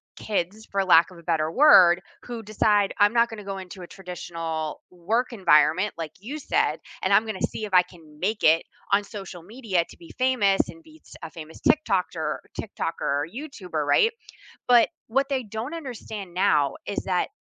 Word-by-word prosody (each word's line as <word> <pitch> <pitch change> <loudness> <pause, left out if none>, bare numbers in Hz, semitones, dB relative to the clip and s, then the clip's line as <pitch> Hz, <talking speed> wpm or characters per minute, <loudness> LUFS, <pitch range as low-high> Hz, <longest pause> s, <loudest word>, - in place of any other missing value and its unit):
kids, 210 +1 -3
for 195 0 +1
lack 170 -2 +5
of 180 - -13
a - - -16
better 160 -2 0
word, 185 - +7 0.2
who 240 -2 -6
decide, 210 -1 +2
I'm 205 +2 +5
not 235 0 +3
gonna 220 -2 -8
go 195 -1 -5
into 185 0 -9
a - - -9
traditional 165 -4 -5
work 210 +9 -1
environment 185 -1 +3
like 160 -2 -5
you 265 +10 -6
said, - - 0 0.2
and - - +2
I'm 215 - +6
gonna 215 -4 -5
see 215 - -2
if 205 - -10
I 180 -1 +7
can 160 -4 -18
make 210 +5 -1
it 160 +1 +5 0.3
on 200 +1 +4
social 195 -5 -9
media 205 -3 -1
to - - -14
be 170 - -14
famous 245 -7 +2
and 330 - -11
beats 315 -1 -18
a 160 - -5
famous 160 -1 -11
TikTokter 180 - +1 0.2
TikToker 205 - -3
or 145 +2 0
YouTuber, 205 - -5
right? 145 - +4 0.6
But 240 -2 +6 0.2
what 270 +4 0
they 265 -2 -1
don't 225 +8 -5
understand 220 - -7
now 155 -7 +2
is 200 - -4
that 180 -2 0
195 Hz, 185 wpm, -25 LUFS, 170-225 Hz, 0.6 s, word